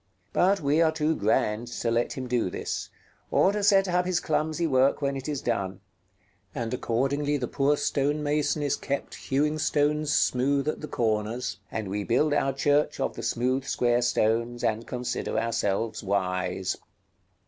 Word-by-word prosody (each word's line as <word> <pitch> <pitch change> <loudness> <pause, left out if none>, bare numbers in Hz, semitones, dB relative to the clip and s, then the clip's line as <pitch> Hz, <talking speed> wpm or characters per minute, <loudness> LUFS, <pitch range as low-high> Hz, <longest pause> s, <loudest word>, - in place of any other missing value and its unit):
But 195 +1 +3
we 145 +3 +2
are 160 -1 +4
too 160 0 0
grand 105 +2 +1
to 120 -1 -2
let 115 +1 +1
him 130 - -5
do 120 -6 0
this, - - -4 0.4
or 190 - +4
to 210 0 -2
set 195 -1 +4
up 180 0 +1
his 180 -2 +1
clumsy 155 +2 0
work 135 -2 +3
when 140 -1 -1
it 135 +2 -5
is 145 -3 -3
done; 95 -1 -2 0.8
and 115 -1 -3
accordingly 140 +5 0
the 125 -3 -3
poor 140 +4 +1
stone 145 +2 0
mason 150 0 0
is 145 - +1
kept 140 0 -4
hewing 150 +3 0
stones 150 0 +1
smooth 140 +3 +2
at 155 - -2
the 150 - -5
corners, 110 -3 -1
and 110 -2 -3
we 100 +2 -2
build 135 +8 +2
our 135 - +2
church 145 +2 +1
of 135 - -1
the - - -6
smooth 125 +3 0
square 120 -2 +1
stones, 120 0 +1
and 110 +1 0
consider 125 -1 -3
ourselves 115 -1 -1
wise. 95 -2 -1
135 Hz, 170 wpm, -27 LUFS, 115-150 Hz, 0.8 s, are